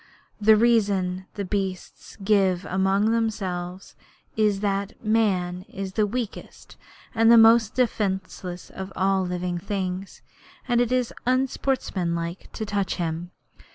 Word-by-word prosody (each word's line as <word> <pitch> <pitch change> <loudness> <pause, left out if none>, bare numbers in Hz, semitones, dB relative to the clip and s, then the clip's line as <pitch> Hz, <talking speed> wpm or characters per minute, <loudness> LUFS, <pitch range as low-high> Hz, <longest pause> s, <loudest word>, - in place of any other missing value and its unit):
The 215 +1 +6
reason 200 -5 +2
the 200 - -3
beasts 190 -1 -4
give 190 -3 +2
among 195 +3 +1
themselves 190 -5 -3 0.4
is 210 -2 +2
that 200 -1 -2
Man 185 -5 +1
is 195 -4 -6
the 210 0 +2
weakest 235 0 -6 0.4
and 225 0 +4
most 225 -1 +5
defenceless 190 -6 -2
of 190 0 -7
all 190 0 +2
living 180 -1 -3
things, 190 0 -4 0.4
and 240 -1 +3
it 245 0 0
is 255 -2 0
unsportsmanlike 195 -10 -1
to 220 - -5
touch 200 -2 -1
him. 170 0 -3
195 Hz, 120 wpm, -25 LUFS, 185-220 Hz, 0.4 s, The